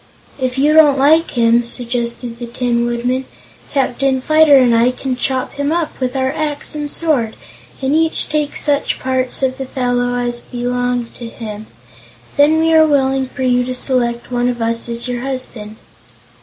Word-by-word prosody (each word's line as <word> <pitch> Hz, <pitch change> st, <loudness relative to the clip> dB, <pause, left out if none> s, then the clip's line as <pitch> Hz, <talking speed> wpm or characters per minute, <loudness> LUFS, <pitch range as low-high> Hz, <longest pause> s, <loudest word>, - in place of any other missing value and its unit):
"If 255 Hz, 0 st, -2 dB
you 295 Hz, +3 st, +3 dB
don't 300 Hz, -3 st, +6 dB
like 310 Hz, +5 st, +4 dB
him," 235 Hz, 0 st, +4 dB
suggested 235 Hz, 0 st, -2 dB
the 240 Hz, -, -5 dB
Tin 235 Hz, 0 st, -1 dB
Woodman, 245 Hz, +2 st, -1 dB, 0.5 s
"Captain 265 Hz, -1 st, 0 dB
Fyter 310 Hz, +1 st, +5 dB
and 250 Hz, -3 st, +4 dB
I 230 Hz, +2 st, +4 dB
can 255 Hz, 0 st, -3 dB
chop 255 Hz, 0 st, -2 dB
him 285 Hz, +1 st, -2 dB
up 330 Hz, -2 st, -2 dB
with 255 Hz, 0 st, -2 dB
our 260 Hz, 0 st, 0 dB
axe 300 Hz, 0 st, -1 dB
and 295 Hz, -1 st, -4 dB
sword, 280 Hz, -10 st, 0 dB, 0.5 s
and 265 Hz, +2 st, +1 dB
each 320 Hz, +1 st, +1 dB
take 300 Hz, -1 st, -2 dB
such 290 Hz, -1 st, 0 dB
parts 260 Hz, 0 st, -2 dB
of 260 Hz, 0 st, -1 dB
the 265 Hz, -, -3 dB
fellow 245 Hz, -1 st, -1 dB
as 240 Hz, -1 st, -1 dB
belong 245 Hz, 0 st, -2 dB
to 235 Hz, -1 st, -7 dB
him. 215 Hz, -2 st, -8 dB, 0.7 s
Then 300 Hz, +2 st, +4 dB
we 325 Hz, 0 st, +2 dB
are 315 Hz, 0 st, +6 dB
willing 270 Hz, -2 st, +1 dB
for 260 Hz, +1 st, -6 dB
you 250 Hz, -1 st, +2 dB
to 255 Hz, +1 st, -4 dB
select 245 Hz, -2 st, -1 dB
one 245 Hz, 0 st, +1 dB
of 240 Hz, -1 st, -3 dB
us 230 Hz, +1 st, -2 dB
as 235 Hz, +1 st, -1 dB
your 245 Hz, -1 st, -3 dB
husband." 250 Hz, -5 st, -4 dB
255 Hz, 175 wpm, -16 LUFS, 240-285 Hz, 0.7 s, don't